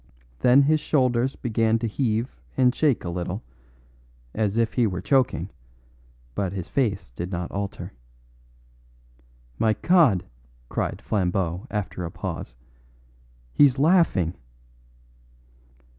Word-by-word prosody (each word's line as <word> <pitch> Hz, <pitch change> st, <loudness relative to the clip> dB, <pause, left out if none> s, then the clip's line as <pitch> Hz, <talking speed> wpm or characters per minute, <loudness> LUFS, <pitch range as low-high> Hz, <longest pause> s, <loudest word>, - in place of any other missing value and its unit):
Then 130 Hz, +3 st, +6 dB
his 155 Hz, +2 st, +3 dB
old 130 Hz, -5 st, +2 dB
shoulders 125 Hz, +3 st, 0 dB
began 115 Hz, -2 st, +1 dB
to 115 Hz, -, -3 dB
heave 115 Hz, +1 st, -1 dB, 0.2 s
and 125 Hz, -2 st, +4 dB
shake 145 Hz, -5 st, +1 dB
a -, -, -2 dB
little, 90 Hz, +4 st, -4 dB, 0.9 s
as 110 Hz, -1 st, 0 dB
if 115 Hz, -1 st, +1 dB
he 120 Hz, -3 st, +2 dB
were 90 Hz, -3 st, -3 dB
choking, 95 Hz, -, +1 dB, 0.8 s
but 95 Hz, +3 st, -2 dB
his 95 Hz, -4 st, -5 dB
face 105 Hz, -, -1 dB
did 85 Hz, +9 st, -6 dB
not 90 Hz, -2 st, -4 dB
alter. 100 Hz, 0 st, -5 dB, 1.7 s
"My 110 Hz, -1 st, +3 dB
God!" 140 Hz, -, +3 dB, 0.4 s
cried -, -, -3 dB
Flambeau 90 Hz, -3 st, -1 dB
after 100 Hz, -3 st, -3 dB
a 85 Hz, -, -3 dB
pause, -, -, -6 dB, 1.0 s
"he's 140 Hz, -3 st, +5 dB
laughing!" 145 Hz, -, +3 dB
110 Hz, 115 wpm, -25 LUFS, 90-130 Hz, 1.7 s, Then